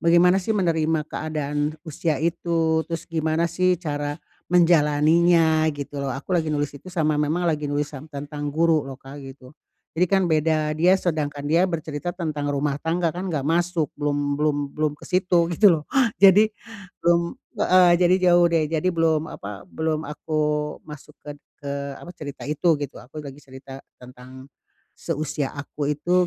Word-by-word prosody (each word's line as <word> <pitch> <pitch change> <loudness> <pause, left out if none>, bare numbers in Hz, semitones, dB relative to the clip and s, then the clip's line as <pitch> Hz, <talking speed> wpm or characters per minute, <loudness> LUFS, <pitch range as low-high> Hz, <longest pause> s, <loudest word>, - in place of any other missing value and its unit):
bagaimana 175 +3 +4
sih 215 +3 -1
menerima 160 -4 +1
keadaan 150 -1 -2
usia 160 0 -2
itu, 165 +1 0
terus 165 -1 -4
gimana 160 0 -1
sih 180 +2 +1
cara 145 -3 -4 0.3
menjalaninya, 160 -1 +4
gitu 140 0 -6
loh. 140 - -2
Aku 135 +7 -5
lagi 165 -3 +1
nulis 145 -1 -1
itu, 145 +6 -12
sama 155 -4 0
memang 155 +4 0
lagi 150 -3 0
nulis 145 +1 -2
yang 145 +2 -9
tentang 145 0 -6
guru, 160 +1 +2
loh 135 - -7
Kak, 140 +2 -11
gitu. 135 0 -12 0.4
Jadi, 180 +3 +2
kan 190 -2 +3
beda. 155 -1 +1
Dia, 180 +4 +4
sedangkan 145 -5 -2
dia 165 +4 +3
bercerita 160 0 -4
tentang 155 -5 -3
rumah 140 0 -1
tangga, 170 +1 0
kan 185 +1 -4
nggak 145 -4 -2
masuk, 170 -1 +1
belum 145 -1 -1
belum 150 0 +1 0.2
belum 155 -1 0
ke - - -12
situ, 180 -2 +2
gitu 205 -2 +7
loh. 150 - -15 0.4
Jadi, 200 +2 +7 0.5
belum 170 0 +1 0.3
heeh, 185 -1 +6
jadi 180 +1 +4 0.2
jauh 175 0 +5
deh. 165 -2 +2
Jadi 165 +3 0
belum, 160 -2 +1
apa, 100 0 -8
belum 160 -1 -2
aku 155 +1 -4 0.5
masuk 150 0 -12
ked 145 -1 -9 0.2
ke, 140 - -5 0.3
apa, 175 - -11
cerita 145 -5 -9
itu, 150 +3 +2
gitu. 145 -2 -6
Aku 145 +5 -10
lagi 140 +1 -9
cerita 135 0 -11 0.2
tentang, 125 +2 -13 0.5
seusia 150 -3 -3
aku 145 0 -4
itu, 175 +5 +1
155 Hz, 165 wpm, -23 LUFS, 145-170 Hz, 0.5 s, gitu